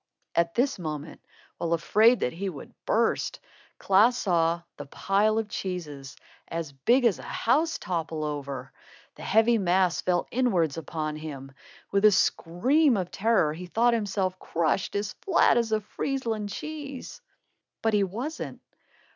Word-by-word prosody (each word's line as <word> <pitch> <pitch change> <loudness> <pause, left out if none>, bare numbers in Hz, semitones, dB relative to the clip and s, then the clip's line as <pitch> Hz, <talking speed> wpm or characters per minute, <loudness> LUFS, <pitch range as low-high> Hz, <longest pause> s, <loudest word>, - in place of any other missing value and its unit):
At 170 0 +1
this 250 -3 +1
moment, 155 -2 -6 0.4
while 170 0 0
afraid 215 +8 +4
that 125 - 0
he 190 +4 -3
would 150 -6 -10
burst, - - +1 0.4
Klaas 215 +6 +4
saw 170 -5 +1
the 145 - -8
pile 205 +8 +1
of 225 -1 -1
cheeses, 160 -10 -6 0.3
as 165 -3 -4
big 235 - +2
as 220 -6 +3
a - - -8
house, 310 +8 +1
topple 165 -3 -3
over. 140 -3 -5 0.4
The - - -14
heavy 225 +2 +3
mass 185 -1 +2
fell 180 -1 +1
inwards 190 - +1
upon 155 -1 -4
him. 140 -3 -8 0.4
With 200 0 +1
a 215 - +8
scream 235 - +2
of 180 -2 -3
terror, 205 -8 +2
he 180 +3 -8
thought 235 +6 +2
himself 190 -4 -1
crushed 170 +3 -1
as 205 0 -2
flat 370 -10 +4
as 235 -2 +1
a 215 0 +1
Friesland 225 -2 -3
cheese. 285 +1 -7 0.6
But 225 -1 +2
he 205 -1 +4
wasn't! 240 - -5
190 Hz, 145 wpm, -27 LUFS, 165-225 Hz, 0.6 s, a